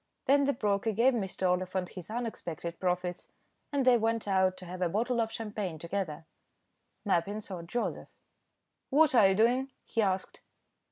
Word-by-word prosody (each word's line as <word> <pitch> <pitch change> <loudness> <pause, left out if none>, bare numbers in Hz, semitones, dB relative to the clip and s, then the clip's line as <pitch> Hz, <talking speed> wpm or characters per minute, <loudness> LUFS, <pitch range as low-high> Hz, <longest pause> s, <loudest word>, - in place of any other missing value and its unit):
Then 280 +1 +4
the 280 - +2
broker 210 -1 0
gave 240 +6 +4
Mr. 190 -4 -1
Oliphant 180 0 0
his 180 0 -10
unexpected 175 -8 -5
profits, 180 -1 -2 0.4
and 280 -3 +1
they 250 -2 +6
went 225 0 0
out 190 -1 +2
to 185 - -9
have 180 +1 -7
a 180 - +2
bottle 235 +5 +1
of 225 0 -1
champagne 210 -7 -4
together. 170 -1 -4 0.8
Mappin 195 +2 +1
sought 185 -5 -7
Joseph. 240 +7 -3 0.8
"What 300 +1 +5
are 220 -6 +7
you 190 - +2
doing?" 245 +5 +3 0.2
he 225 - 0
asked. 190 -2 -1
200 Hz, 160 wpm, -30 LUFS, 180-230 Hz, 0.8 s, are